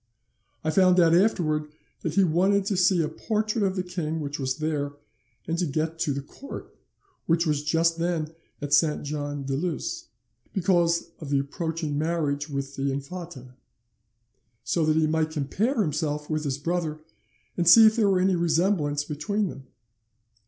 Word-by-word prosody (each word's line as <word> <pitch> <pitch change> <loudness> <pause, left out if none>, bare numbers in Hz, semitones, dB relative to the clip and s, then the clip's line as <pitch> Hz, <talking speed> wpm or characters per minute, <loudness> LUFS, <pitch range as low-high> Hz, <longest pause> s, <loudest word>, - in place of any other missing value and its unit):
I 155 - 0
found 185 0 +5
out 165 -2 +5
afterwards 165 -6 +2 0.3
that 160 -1 -3
he 195 - +5
wanted 190 +4 +2
to 200 - 0
see 180 -1 +3
a - - -1
portrait 215 +2 -1
of 190 -1 0
the 185 - -1
king 170 -3 -3
which 145 -1 -4
was 130 -1 -1
there, 150 -2 -2 0.5
and 165 +1 -1
to 180 - +1
get 160 +3 -2
to 150 - 0
the 140 0 -3
court, 275 - -10 0.5
which 165 +1 +2
was 150 -2 +1
just 165 +2 +1
then 165 -2 -1 0.3
at 145 0 -2
Saint 150 +1 +3
Jean 145 -1 -4
de 135 0 -3
Luz, 165 +3 -3 0.5
because 170 -3 +1
of 155 - -7
the 140 - +2
approaching 155 +1 -2
marriage 155 -2 -1
with 140 -1 -4
the 135 0 0
infanta; 140 -2 -7 1.1
so 160 +7 0
that 155 - +3
he 160 0 +3
might 155 0 +1
compare 180 - -1
himself 150 -1 -2
with 155 0 -1
his 135 -2 -1
brother 160 0 -2 0.6
and 170 -1 +3
see 225 +5 +10
if 220 0 +5
there 215 -4 +3
were 190 -2 +3
any 190 +1 +3
resemblance 165 -3 +1
between 195 +8 -2
them. 135 -3 -10
160 Hz, 170 wpm, -26 LUFS, 145-180 Hz, 1.1 s, see